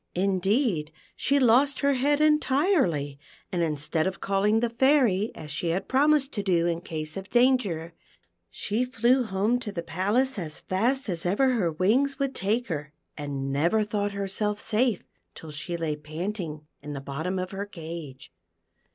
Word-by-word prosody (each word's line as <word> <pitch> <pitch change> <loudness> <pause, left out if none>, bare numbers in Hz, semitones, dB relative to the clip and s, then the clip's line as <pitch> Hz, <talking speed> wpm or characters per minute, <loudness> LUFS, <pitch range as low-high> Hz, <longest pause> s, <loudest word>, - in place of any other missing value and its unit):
Indeed 190 - +1 0.2
she 280 +1 +2
lost 265 +3 +4
her 280 0 +3
head 285 +3 +2
entirely, 270 - +2 0.3
and 175 - -1
instead 155 +1 0
of 190 - -4
calling 200 +3 +2
the 240 0 0
Fairy 235 -5 +3
as 150 -1 -8
she 155 +4 -2
had 170 +3 -1
promised 285 +1 +3
to 205 - -3
do 175 -4 +2
in 170 -1 -1
case 155 -3 -5
of 195 0 -7
danger, 220 -10 +2 0.6
she 220 +4 -2
flew 250 +1 +2
home 215 +2 0
to 225 -4 -5
the 170 -4 -4
palace 210 +9 0
as 155 -4 -5
fast 245 +8 0
as 170 -4 -2
ever 205 +10 +2
her 210 -10 +1
wings 240 - +2
would 275 -1 -1
take 220 +5 0
her, 150 -2 -5 0.2
and 140 -2 -4
never 170 +10 +2
thought 205 -1 -2
herself 200 +1 -2
safe 225 -1 +1 0.3
till 160 - -9
she 170 +4 -4
lay 160 -2 -1
panting 155 +1 -5 0.2
in 145 +1 -7
the 140 - -4
bottom 155 +7 -4
of 185 0 -3
her 200 +1 -4
cage. 160 - -8
195 Hz, 165 wpm, -26 LUFS, 165-245 Hz, 0.6 s, lost